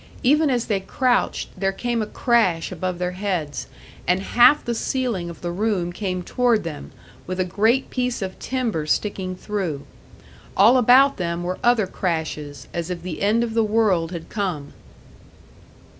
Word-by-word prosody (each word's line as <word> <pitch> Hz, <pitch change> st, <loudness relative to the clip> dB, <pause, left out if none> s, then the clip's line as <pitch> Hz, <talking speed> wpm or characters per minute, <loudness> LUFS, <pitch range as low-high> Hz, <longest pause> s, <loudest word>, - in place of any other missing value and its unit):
Even 300 Hz, +4 st, +4 dB
as 245 Hz, -3 st, 0 dB
they 205 Hz, -3 st, 0 dB
crouched, 245 Hz, +5 st, 0 dB
there 195 Hz, -1 st, 0 dB
came 235 Hz, +3 st, -2 dB
a 215 Hz, -, -2 dB
crash 215 Hz, -9 st, +1 dB
above 185 Hz, -1 st, -3 dB
their 180 Hz, 0 st, -2 dB
heads, 180 Hz, -6 st, -3 dB, 0.4 s
and 180 Hz, +1 st, +3 dB
half 240 Hz, +8 st, +5 dB
the 240 Hz, -, -1 dB
ceiling 230 Hz, -7 st, -2 dB
of 170 Hz, -, -10 dB
the 175 Hz, -, -3 dB
room 185 Hz, -2 st, -1 dB
came 185 Hz, -2 st, -3 dB
toward 240 Hz, 0 st, +1 dB
them, 155 Hz, -4 st, -7 dB, 0.4 s
with 185 Hz, +1 st, -4 dB
a 185 Hz, -, +2 dB
great 220 Hz, +8 st, +1 dB
piece 250 Hz, -4 st, -1 dB
of 190 Hz, -1 st, -6 dB
timber 230 Hz, -12 st, -2 dB
sticking 190 Hz, 0 st, -1 dB
through. 185 Hz, -8 st, -4 dB, 0.7 s
All 225 Hz, +6 st, +7 dB
about 260 Hz, +4 st, +5 dB
them 170 Hz, -2 st, -2 dB
were 180 Hz, +1 st, -3 dB
other 240 Hz, -3 st, +4 dB
crashes, 160 Hz, -6 st, -4 dB
as 170 Hz, 0 st, -3 dB
if 175 Hz, -2 st, -5 dB
the 180 Hz, -3 st, -5 dB
end 215 Hz, +4 st, +3 dB
of 230 Hz, -2 st, -3 dB
the 225 Hz, 0 st, +3 dB
world 210 Hz, -6 st, +2 dB
had 170 Hz, -2 st, -6 dB
come. 180 Hz, -9 st, -3 dB
195 Hz, 165 wpm, -22 LUFS, 175-235 Hz, 0.7 s, All